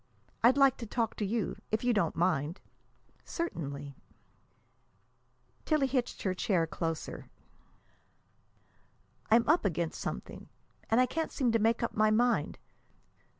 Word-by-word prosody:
I'd 250 +4 +6
like 275 -2 +5
to 230 - -7
talk 225 0 -1
to 210 - -1
you, 225 +1 -2
if 220 +2 0
you 245 0 +3
don't 170 -7 +1
mind." 165 -1 0 0.6
"Certainly." 145 - -5 1.7
Tillie 305 -3 +2
hitched 260 -2 -2
her 190 - +1
chair 185 -3 +1
closer. 165 0 -4 2.0
"I'm 230 +2 +4
up 315 +4 +4
against 170 -4 -2
something, - - -6 0.4
and 225 - +4
I 255 - +6
can't 320 +5 -3
seem 255 -5 +1
to 230 - +2
make 225 +2 +2
up 235 - -1
my 215 0 +4
mind. 240 +3 +2
225 Hz, 130 wpm, -31 LUFS, 175-245 Hz, 2.0 s, I'd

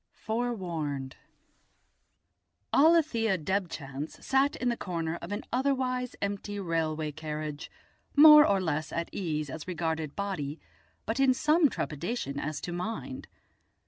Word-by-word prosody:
FOREWARNED 175 - -3 1.6
Alethia 280 - +4
Debchance 155 -5 -3
sat 270 +2 +3
in 245 -1 0
a - - -1
corner 170 -5 -3
of 170 - -8
an 205 +2 -3
otherwise 255 -1 0
empty 200 0 -3
railway 160 -4 -1
carriage, 150 -1 -5 0.5
more 300 0 +10
or 200 -8 +3
less 160 -4 -2
at 170 0 -3
ease 155 -5 -2
as 155 +4 -7
regarded 160 -4 -2
body, 165 -7 -3 0.5
but 225 +4 -2
in 265 -2 +4
some 305 +3 +4
trepidation 150 - -3
as 155 0 -3
to 175 - -5
mind. 225 +9 -5
185 Hz, 120 wpm, -29 LUFS, 155-245 Hz, 1.6 s, more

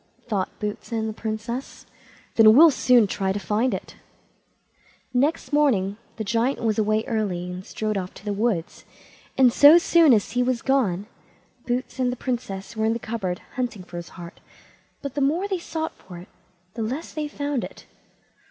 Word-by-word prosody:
thought 200 -5 -1
Boots 210 +3 -5
and 220 -1 -1
the 220 - -4
Princess; 225 +4 -5 0.5
"then 220 -1 +7
we'll 320 +3 +8
soon 250 -4 +4
try 190 -1 -1
to 195 - -2
find 215 +5 0
it." 190 - -6 1.2
Next 285 +4 0
morning 220 -10 +2 0.2
the 220 - -4
Giant 230 +5 0
was 220 -1 +1
away 215 +1 +1
early, 185 -6 -2
and 180 +1 -7
strode 215 0 -3
off 185 0 -6
to - - -14
the 205 - -1
wood, 200 -5 0 0.7
and 255 -3 +5
so 290 +5 +9
soon 335 -3 +5
as 210 -5 +3
he 245 +2 +1
was 250 -1 0
gone 210 -9 +1 0.6
Boots 250 +1 -3
and 250 -1 +1
the - - -3
Princess 230 -6 -4
were 220 0 0
in 225 - +2
the - - -2
cupboard 215 -6 -4 0.2
hunting 240 -6 -3
for 175 - -9
his 170 0 -7
heart, 170 -1 -10 0.6
but 280 -2 -4
the 285 - -2
more 320 +8 +1
they 380 -3 -2
sought 320 -1 -4
for 180 -2 -13
it, 175 - -12 0.4
the 230 - -5
less 255 +9 -4
they 300 -1 -3
found 285 -3 -3
it. - - -9
225 Hz, 180 wpm, -24 LUFS, 205-260 Hz, 1.2 s, so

